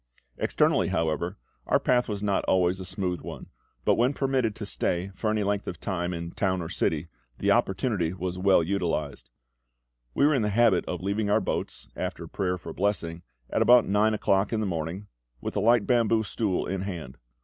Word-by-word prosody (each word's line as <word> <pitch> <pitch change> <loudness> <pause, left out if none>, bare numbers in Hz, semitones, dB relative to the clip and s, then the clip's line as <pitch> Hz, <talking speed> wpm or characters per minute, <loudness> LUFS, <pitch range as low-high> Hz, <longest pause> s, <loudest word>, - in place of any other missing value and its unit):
Externally, - - +2
however, 80 +3 -1 0.3
our - - +3
path 125 -1 +2
was 105 -1 -3
not 100 -2 +1
always 90 0 +2
a 95 - -6
smooth 90 -1 -3
one; - - -8 0.4
but - - +5
when 125 +4 +2
permitted 130 -6 0
to 105 - -6
stay 90 -1 -1
for 105 +4 -2
any 105 -1 +1
length 100 0 -1
of 90 - -5
time 90 -2 -2
in 85 -1 -5
town 95 0 0
or 80 -2 -5
city, 80 +1 -1 0.3
the - - +1
opportunity 95 -5 +1
was 90 -1 -4
well 95 -2 +4
utilised. 80 -8 -2 0.9
We 140 - +4
were 150 - +4
in 135 - +2
the 105 - +1
habit 110 -3 +3
of 90 0 -4
leaving 100 +2 0
our 105 +2 +4
boats, 95 - -4
after - - -4
prayer 90 -1 -1
for - - -8
blessing, 85 -4 -1 0.3
at - - +1
about 120 -1 +6
nine 105 +3 +2
o'clock 100 -1 +1
in 110 - 0
the 110 - 0
morning, 85 +2 -3 0.3
with - - -5
a - - +1
light 115 -2 +4
bamboo 115 -2 +3
stool 105 -3 -1
in 95 0 -3
hand. 85 -11 -6
95 Hz, 195 wpm, -27 LUFS, 90-110 Hz, 0.9 s, about